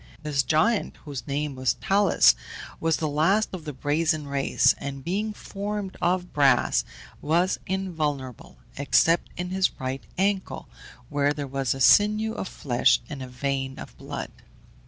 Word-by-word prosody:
This 145 -2 +1
giant, 160 - +1
whose 145 -1 -6
name 145 +1 -2
was 130 -1 0
Talus, 200 -1 +4 0.5
was 165 -1 +1
the 155 - -1
last 165 +9 +2
of 175 -4 -7
the 150 - -4
Brazen 150 +3 0
race, 140 -1 +2
and 140 -1 -6
being 205 +7 -1
formed 205 -1 -5
of 180 0 0
brass, 135 -4 +3 0.4
was 170 +5 +1
invulnerable, 155 - -3 0.2
except 165 +4 +3
in 180 0 -4
his 190 -3 0
right 130 0 -4
ankle, 195 0 -1 0.4
where 145 0 +1
there 145 -1 -4
was 135 -1 -1
a - - -7
sinew 215 +9 +4
of 195 - -4
flesh 125 -8 +2
and 145 -3 -6
a 130 - -6
vein 135 +1 -3
of - - -10
blood. - - -6
150 Hz, 150 wpm, -25 LUFS, 140-190 Hz, 0.5 s, Talus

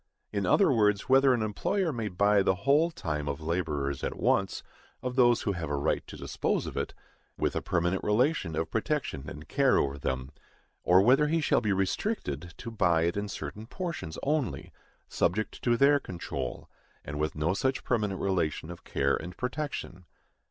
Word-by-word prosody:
In 100 -3 0
other 195 - +5
words, 105 -4 +2
whether 135 0 +6
an 120 -3 +2
employer 165 - 0
may 115 -3 -2
buy 100 +1 +3
the 95 -1 +2
whole 150 +5 +4
time 75 - -4
of 70 -1 -2
laborers 75 -4 -2
at - - -3
once, - - +1 0.4
of 125 -1 -3
those 120 -2 +4
who 100 - +1
have 85 -5 -4
a 75 - 0
right 70 - 0
to - - -9
dispose - - -1
of - - -6
it, - - -3 0.4
with - - 0
a - - 0
permanent 90 +2 0
relation 105 - +1
of 80 0 -2
protection 110 - -2
and 75 +1 -9
care 135 -2 +3
over 70 0 0
them; 65 0 -3 0.5
or 90 +2 +5
whether 135 +6 +5
he 165 +2 +1
shall 150 - +2
be 105 -3 0
restricted 95 - -2
to 115 - -7
buy 85 -7 +2
it 85 +1 0
in 100 0 -2
certain 105 +2 -6
portions 170 - -5
only, 145 -7 -1 0.3
subject 110 +5 -1
to 120 -1 +2
their 145 +2 +5
control, 70 - -5 0.4
and 75 - -5
with 75 0 -1
no 80 +4 +1
such 130 +5 -1
permanent 105 -5 0
relation 85 -4 -1
of 85 - -10
care 70 0 +1
and 90 +3 -7
protection. 125 - -4
100 Hz, 180 wpm, -29 LUFS, 80-130 Hz, 0.5 s, whether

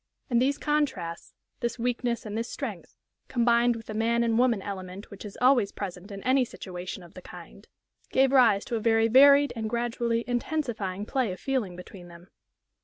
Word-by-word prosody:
And 240 0 +3
these 280 +2 +1
contrasts 265 - -2 0.2
this 235 +1 -2
weakness 240 0 -2
and 210 -1 -5
this 230 +2 -3
strength - - -7 0.3
combined 240 0 +3
with 225 -1 -9
the 215 - -7
man 230 +2 +1
and 230 0 +1
woman 245 -4 +3
element 190 0 -7
which 200 - -10
is 205 -2 -9
always 250 -5 +4
present 190 0 -7
in 200 -1 -8
any 260 +1 +3
situation 185 -5 -7
of 170 - -15
the - - -10
kind, - - -13 0.4
gave 265 0 +3
rise 230 -7 +4
to 235 - -3
a - - 0
very 225 0 +3
varied 280 +4 +6
and 220 -1 -3
gradually 235 0 -1
intensifying 235 -6 -2
play 250 -3 -1
of 185 - -7
feeling 250 -10 -2
between 180 0 -11
them. 175 +2 -15
230 Hz, 180 wpm, -27 LUFS, 200-245 Hz, 0.4 s, varied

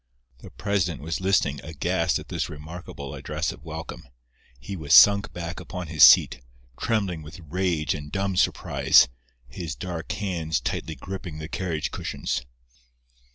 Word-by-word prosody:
The - - -11
president 95 -6 -1
was 80 +3 -3
listening, 95 -7 +1
aghast, 75 -2 0
at - - -10
this - - -2
remarkable 75 -2 -8
address 70 - -3
of - - -13
welcome. - - -8 0.5
He 100 +10 -6
was 80 -3 +3
sunk 100 -1 +7
back 85 0 -6
upon 90 -4 -7
his 80 -3 +4
seat, - - +7 0.3
trembling 100 - -1
with 75 +4 -11
rage 85 -1 -1
and 75 -1 -7
dumb 95 -1 -1
surprise, - - +4 0.4
his 75 +4 -6
dark 85 -3 -5
hands 85 -7 -2
tightly 80 +5 -3
gripping 90 -3 -7
the 80 0 -6
carriage 85 -4 -3
cushions. - - -3
85 Hz, 145 wpm, -25 LUFS, 75-95 Hz, 0.5 s, sunk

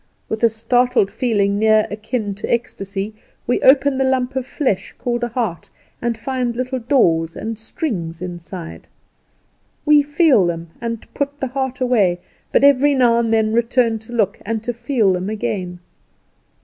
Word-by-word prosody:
With 220 +1 -3
a 230 - +6
started 245 -1 +1
feeling 205 -5 +1
near 215 0 +4
akin 215 0 -3
to 200 - -5
ecstasy 200 -3 -3 0.3
we 245 - 0
open 270 0 +4
the - - +3
lump 260 0 0
of 260 -1 -2
flesh 260 -12 -2
called 240 -1 -2
a - - +1
heart, 225 -9 -3 0.3
and 235 -1 -1
find 250 -1 -2
little 255 +1 -2
doors 170 - +2
and 225 +1 -4
strings 205 - -4
inside. 165 - -8 1.0
We 295 0 +6
feel 290 - +3
them, 165 -1 -4
and 230 -1 -4
put 285 0 -3
the - - -1
heart 265 0 -3
away; 210 -9 +2 0.3
but - - +3
every 280 +1 +5
now 240 -3 +4
and 230 -1 0
then 220 -1 +2
return 235 -1 +2
to 220 +2 -13
look, 210 -4 0
and 225 +1 -3
to 240 - -2
feel 235 -4 +1
them 185 +2 -2
again. 205 -5 -3
230 Hz, 160 wpm, -19 LUFS, 200-255 Hz, 1.0 s, a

